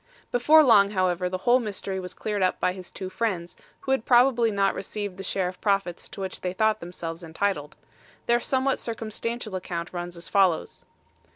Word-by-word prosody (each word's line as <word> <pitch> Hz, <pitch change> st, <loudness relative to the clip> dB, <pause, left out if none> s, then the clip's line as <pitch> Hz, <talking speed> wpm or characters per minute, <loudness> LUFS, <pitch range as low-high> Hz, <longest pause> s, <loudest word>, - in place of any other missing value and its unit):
Before 300 Hz, +6 st, +6 dB
long, 205 Hz, -7 st, +6 dB
however, 185 Hz, -2 st, 0 dB
the 185 Hz, -, -2 dB
whole 245 Hz, +6 st, +4 dB
mystery 200 Hz, -4 st, -4 dB
was 180 Hz, -1 st, -7 dB
cleared 210 Hz, -2 st, -2 dB
up 185 Hz, -1 st, +1 dB
by 180 Hz, -, +1 dB
his 185 Hz, -1 st, -9 dB
two 190 Hz, -, -6 dB
friends, 185 Hz, -3 st, -2 dB, 0.3 s
who 270 Hz, -, -3 dB
had 265 Hz, -4 st, +2 dB
probably 245 Hz, -1 st, +4 dB
not 200 Hz, -2 st, +1 dB
received 205 Hz, 0 st, -5 dB
the 195 Hz, -, -6 dB
share 190 Hz, -1 st, -1 dB
of 180 Hz, -, -6 dB
the -, -, -38 dB
profits 195 Hz, -4 st, 0 dB
to -, -, -8 dB
which 190 Hz, -, -4 dB
they 180 Hz, -1 st, -2 dB
thought 215 Hz, +2 st, +2 dB
themselves 170 Hz, -1 st, -6 dB
entitled. 160 Hz, -2 st, -2 dB, 0.5 s
Their 235 Hz, 0 st, +3 dB
somewhat 265 Hz, +2 st, 0 dB
circumstantial 225 Hz, -1 st, -4 dB
account 175 Hz, -2 st, -5 dB
runs 175 Hz, 0 st, -5 dB
as 170 Hz, -, -6 dB
follows. 190 Hz, -5 st, +1 dB
195 Hz, 190 wpm, -26 LUFS, 180-230 Hz, 0.5 s, Before